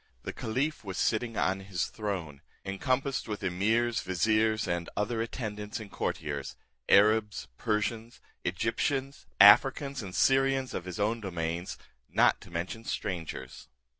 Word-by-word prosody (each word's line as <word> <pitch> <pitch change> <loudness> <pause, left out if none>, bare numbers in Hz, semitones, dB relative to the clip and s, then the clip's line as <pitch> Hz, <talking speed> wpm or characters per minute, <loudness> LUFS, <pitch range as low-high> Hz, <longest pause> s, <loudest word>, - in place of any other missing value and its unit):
The - - -5
caliph 135 +7 -2
was 95 -3 -6
sitting 115 0 0
on 95 +1 +1
his 95 -3 -2
throne, 90 -10 -5 0.2
encompassed 130 +7 -1
with 105 -2 -5
emirs, 110 +6 +1
viziers, 110 +3 +1
and. 85 -1 -2
other 110 +2 0
attendants 105 -3 -4
and 105 -3 -9
courtiers, 70 -3 -3 0.3
Arabs, 105 +1 +4
Persians, 110 +1 -2 0.2
Egyptians, 130 +8 -1
Africans, 135 +6 +6
and 95 -3 -7
Syrians, 135 -1 +3
of 90 - -4
his 90 +3 -6
own 110 +3 0
dominions, 85 -2 -3 0.3
not - - +3
to - - -13
mention 90 +7 -4
strangers. 85 - -5
105 Hz, 130 wpm, -29 LUFS, 95-115 Hz, 0.3 s, Africans